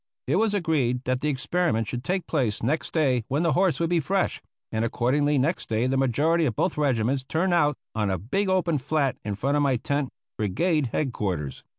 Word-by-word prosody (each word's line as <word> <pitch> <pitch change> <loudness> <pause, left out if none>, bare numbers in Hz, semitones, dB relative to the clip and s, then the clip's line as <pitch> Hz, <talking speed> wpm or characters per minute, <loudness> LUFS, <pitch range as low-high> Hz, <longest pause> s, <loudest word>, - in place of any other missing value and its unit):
It 145 +7 +1
was 215 0 +2
agreed 140 -9 0
that 130 0 -1
the 150 - 0
experiment 135 -5 0
should 125 +2 -4
take 185 -1 -1
place 125 -11 -1
next 150 +7 -1
day 130 -7 +2
when 145 +6 0
the 165 -3 +2
horse 185 +3 +2
would 165 0 0
be 175 - +3
fresh, 190 +6 0 0.3
and 110 0 0
accordingly 140 +5 +1
next 150 +7 0
day 110 +2 +1
the 130 +1 +1
majority 150 +6 +2
of 115 - -2
both - - 0
regiments 130 -2 +1
turned 170 +7 0
out 150 -5 +3 0.2
on 105 -2 0
a 95 - 0
big 190 - -1
open 175 -5 +1
flat 140 0 0
in 105 -1 -3
front 140 +8 0
of - - +2
my 140 -2 +2
tent 140 +3 -1 0.3
brigade 140 - +1
head 130 +2 -2
quarters. 85 -11 -3
140 Hz, 210 wpm, -25 LUFS, 120-165 Hz, 0.3 s, be